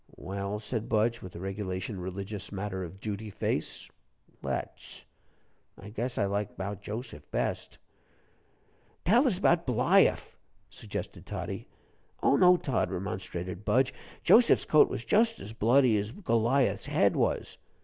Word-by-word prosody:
"Well," 100 +2 -4
said 110 +1 -4
Budge, 115 +2 +1
with 95 - -9
the - - -8
regulation 95 0 -4
religious 95 +2 -5
matter 95 -1 -4
of 90 +3 -9
duty 105 +1 -5
face, 100 - -3 0.5
"let's. - - -5 0.7
I 100 - -9
guess 120 +3 -3
I 100 - +2
like 100 +1 -2
'bout 100 +1 -4
Joseph 105 - -7
best." - - -2 1.3
"Tell 240 - +5
us 195 - +1
'bout 170 -4 +2
Bliaff," 130 - +3 0.4
suggested - - -6
Toddie. - - -5 0.6
"Oh, - - +5
no, 180 -1 +6
Tod," 130 - -1
remonstrated 90 0 -5
Budge; 130 +4 +2 0.3
"Joseph's 235 +1 +6
coat 155 - +5
was 125 -2 -5
just 225 +1 +3
as 110 - -7
bloody 120 +2 +4
as 105 +2 -3
Goliath's 125 - +1
head - - +3
was." - - -1
105 Hz, 135 wpm, -29 LUFS, 95-130 Hz, 1.3 s, no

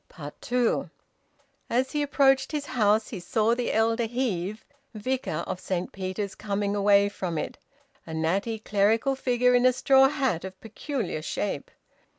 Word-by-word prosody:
TWO. 245 -1 0 0.8
As 255 +2 +1
he 295 - -1
approached 275 -1 +3
his 295 -2 -2
house, 215 -2 +2
he 210 - -6
saw 220 +5 +1
the 245 0 -1
elder 225 +1 +1
Heve, 215 -4 -2 0.3
vicar 215 -7 -2
of 180 - -4
Saint 185 -1 -3
Peter's, 190 +1 -4
coming 200 -1 -2
away 200 0 +4
from 185 -5 -4
it, - - -4 0.5
a 160 - -6
natty 195 +8 0
clerical 220 +5 +1
figure 250 -1 +2
in 245 0 +4
a 255 - +6
straw 270 +1 +5
hat 265 - -1
of 190 0 -8
peculiar 225 - -4
shape. 165 -1 -3
220 Hz, 150 wpm, -26 LUFS, 195-255 Hz, 0.8 s, a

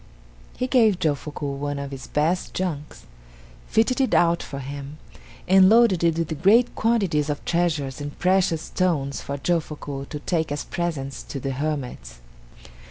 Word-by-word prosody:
He 255 - 0
gave 230 -7 +4
Jofuku 150 -3 -2
one 145 0 -2
of 140 0 -5
his 135 -1 -8
best 160 +5 0
junks, 155 -6 -4 0.6
fitted 245 +4 +2
it 260 - +2
out 170 0 +3
for 140 - -7
him, 140 +2 -7 0.5
and 190 0 +7
loaded 225 -6 +5
it 165 -1 +2
with 160 -2 -3
great 225 +6 +5
quantities 195 -10 +1
of 145 - -3
treasures 155 -6 0
and 145 0 -6
precious 180 -3 +2
stones 150 -7 -1
for 140 - -4
Jofuku 145 -3 -3
to 150 - -5
take 160 -1 -1
as 145 - -2
presents 150 -6 -3
to 140 - -6
the 135 +1 -3
hermits. 130 - -4
155 Hz, 155 wpm, -24 LUFS, 140-185 Hz, 0.6 s, and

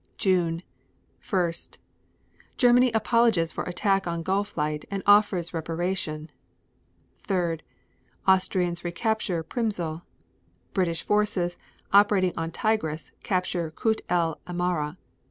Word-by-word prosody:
June 175 -3 +1 0.7
1. 175 -3 +2 1.0
Germany 245 0 +5
apologizes 220 -6 +3
for - - -4
attack 195 +1 +1
on 170 -1 -2
Gulflight 165 -6 -1
and 195 -1 -3
offers 205 -4 +4
reparation. 165 -1 -3 0.9
3. 175 -5 -1 0.7
Austrians 180 -2 +2
recapture 180 -1 -1
Przmysl. 175 -7 -2
3. - - -35 0.7
British 175 -4 0
forces 205 -4 +1 0.3
operating 200 -3 +5
on 165 0 -2
Tigris 165 -5 -1
capture 180 -3 -1
Kut 220 +7 0
el 170 -3 +1
Amara. 175 -4 -1
180 Hz, 100 wpm, -26 LUFS, 165-205 Hz, 1.0 s, Germany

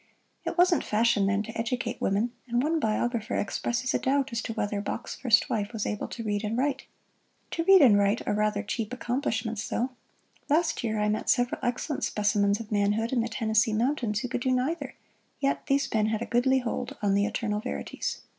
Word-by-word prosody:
It - - -3
wasn't 355 -1 +4
fashion 215 -2 +2
then 200 +1 +1
to 225 +2 -9
educate 235 +2 -2
women, 205 +5 +1 0.2
and 240 +1 +1
one 320 +2 +1
biographer 225 -2 -1
expresses 240 +5 -1
a - - +2
doubt 275 0 +1
as 235 0 -2
to 225 - -4
whether 205 -2 -2
Bach's 205 - -4
first 230 -3 +3
wife 210 0 -2
was 215 -2 -2
able 210 - -3
to 230 - -6
read 205 -1 -1
and 215 +2 -2
write. 270 +1 -1 0.6
To 330 - -1
read 385 -3 +8
and 230 -6 +7
write 200 +3 +1
are - - +1
rather 210 0 0
cheap 225 +2 -3
accomplishments, 230 -4 -2
though. 250 +3 -1 0.6
Last 325 0 +2
year 220 -2 -1
I 210 - +1
met 215 +1 -1
several 245 -1 +2
excellent 250 +4 -2
specimens 205 0 +1
of 225 -1 -9
manhood 210 +3 +1
in 245 - +2
the 230 - -2
Tennessee 220 0 +1
Mountains 230 -2 0
who - - -3
could 250 0 -3
do 260 - 0
neither, 260 +7 -1 0.4
yet 275 0 -1
these 280 0 +2
men 215 -1 +2
had 220 +1 -1
a - - -4
goodly 260 +2 +2
hold 255 +2 -3
on 200 -1 +3
the 200 +1 +2
eternal 215 -1 -2
verities. 250 +4 -4
230 Hz, 200 wpm, -27 LUFS, 210-255 Hz, 0.6 s, read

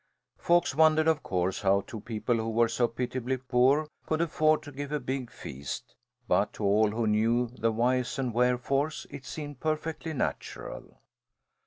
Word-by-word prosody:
Folks 175 -3 +3
wondered, 155 +1 +4
of 160 -2 +3
course, 90 0 -1
how 100 0 +3
two 115 +1 -8
people 115 +1 -1
who 110 0 -2
were 115 +1 +3
so 120 +1 +1
pitiably 125 +2 -2
poor 130 +4 +3 0.2
could 155 - 0
afford 155 -2 +2
to 145 - -9
give 145 +1 -6
a 150 - 0
big 130 -1 -3
feast, 70 +1 -7 0.3
but 100 - +2
to - - -6
all 105 +2 +4
who 115 +2 -1
knew 115 +3 +2
the 115 +1 +2
whys 125 +3 +1
and 130 -3 -1
wherefores 125 +5 +1
it 135 - -9
seemed 145 -4 -7
perfectly 160 +1 -2
natural. 135 - -4
125 Hz, 165 wpm, -29 LUFS, 115-145 Hz, 0.3 s, wondered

